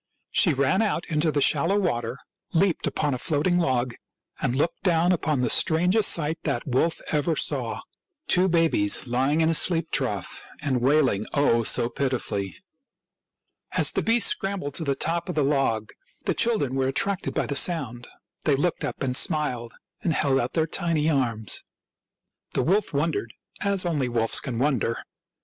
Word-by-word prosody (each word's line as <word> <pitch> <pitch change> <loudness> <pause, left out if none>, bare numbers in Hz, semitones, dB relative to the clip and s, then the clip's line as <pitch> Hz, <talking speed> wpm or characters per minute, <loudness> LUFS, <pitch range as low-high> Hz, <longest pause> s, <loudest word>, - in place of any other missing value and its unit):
She 165 -6 +3
ran 140 +9 +2
out 205 -6 -1
into 155 0 +1
the 145 -1 0
shallow 165 +8 +2
water, 120 - -1 0.4
leaped 180 0 +1
upon 145 -2 -1
a 125 - -3
floating 165 +6 +1
log, 130 -6 0 0.5
and 120 - 0
looked 160 +5 -1
down 175 -1 +2
upon 155 -6 0
the 125 - +1
strangest 180 +6 +3
sight 160 0 0
that 140 -6 -2
wolf 135 +6 0
ever 155 +2 +1
saw - - -1 0.2
— 350 -6 -53
two 185 +1 +3
babies 165 - +2
lying 135 +6 +1
in 160 - +3
a - - +2
sheep 165 0 +2
trough 105 -9 -3 0.2
and 130 -4 -1
wailing, 130 -6 +2
oh, 140 -5 +3
so 115 +1 +2
pitifully! 120 -8 -2 1.2
As - - +4
the - - -1
beast 230 -1 +3
scrambled 195 -8 -2
to 165 - -1
the 140 -3 0
top 170 +4 -2
of 180 - -3
the 150 - +2
log 135 -6 0 0.3
the - - +1
children 215 - 0
were 135 0 0
attracted 185 +8 -1
by - - 0
the 140 - -4
sound; 135 -8 -1 0.4
they 145 - +3
looked 165 +5 -1
up - - -4
and 125 -1 -1
smiled 125 -7 0 0.3
and 165 - 0
held 135 -3 +2
out 120 0 -2
their 160 -2 +1
tiny 160 -1 0
arms. 115 -7 -1 0.9
The - - +1
wolf 200 +4 +1
wondered, 145 -6 -2 0.3
as 200 -2 +2
only 145 -7 0
wolves 115 -1 +1
can 125 -5 -5
wonder. 125 -3 0
150 Hz, 170 wpm, -25 LUFS, 130-170 Hz, 1.2 s, As